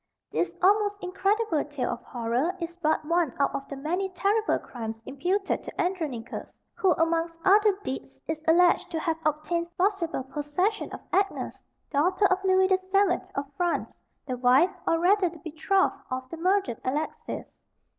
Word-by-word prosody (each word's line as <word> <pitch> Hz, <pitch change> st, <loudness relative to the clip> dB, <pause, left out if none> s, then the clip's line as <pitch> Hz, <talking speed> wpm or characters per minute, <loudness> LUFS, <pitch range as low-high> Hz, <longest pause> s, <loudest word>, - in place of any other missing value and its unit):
This -, -, -1 dB
almost 410 Hz, +1 st, +4 dB
incredible 390 Hz, -1 st, +1 dB
tale 290 Hz, -4 st, -3 dB
of 240 Hz, -, -5 dB
horror 245 Hz, +9 st, -1 dB
is 340 Hz, 0 st, -5 dB
but 315 Hz, -3 st, 0 dB
one 335 Hz, -4 st, +1 dB
out 280 Hz, -, +1 dB
of 275 Hz, -, -4 dB
the 280 Hz, -, -5 dB
many 350 Hz, +8 st, -2 dB
terrible 405 Hz, +4 st, +1 dB
crimes 225 Hz, -2 st, -6 dB
imputed 365 Hz, +9 st, -1 dB
to -, -, -9 dB
Andronicus, 320 Hz, -10 st, -3 dB, 0.2 s
who 375 Hz, -3 st, +3 dB
amongst 330 Hz, +1 st, 0 dB
other 410 Hz, 0 st, +5 dB
deeds 135 Hz, -, -6 dB
is 315 Hz, -1 st, -3 dB
alleged 345 Hz, +2 st, +4 dB
to 325 Hz, -, -2 dB
have 320 Hz, 0 st, -1 dB
obtained 335 Hz, +3 st, -1 dB
forcible 360 Hz, -7 st, 0 dB
possession 295 Hz, +10 st, -1 dB
of -, -, -7 dB
Agnes, 390 Hz, 0 st, 0 dB, 0.3 s
daughter 360 Hz, +8 st, +2 dB
of 380 Hz, 0 st, +2 dB
Louis 375 Hz, 0 st, +4 dB
the 380 Hz, 0 st, +4 dB
Seventh 375 Hz, -1 st, +1 dB
of 280 Hz, -, -1 dB
France, 350 Hz, -1 st, -1 dB, 0.3 s
the 255 Hz, -3 st, -3 dB
wife, 260 Hz, +9 st, +5 dB, 0.2 s
or 330 Hz, -, +3 dB
rather 365 Hz, +2 st, +3 dB
the 335 Hz, -, -12 dB
betrothed, 325 Hz, +5 st, 0 dB
of 255 Hz, 0 st, -3 dB
the 330 Hz, -, -5 dB
murdered 365 Hz, -, +1 dB
Alexis. 295 Hz, +5 st, -3 dB
340 Hz, 160 wpm, -27 LUFS, 290-380 Hz, 0.3 s, other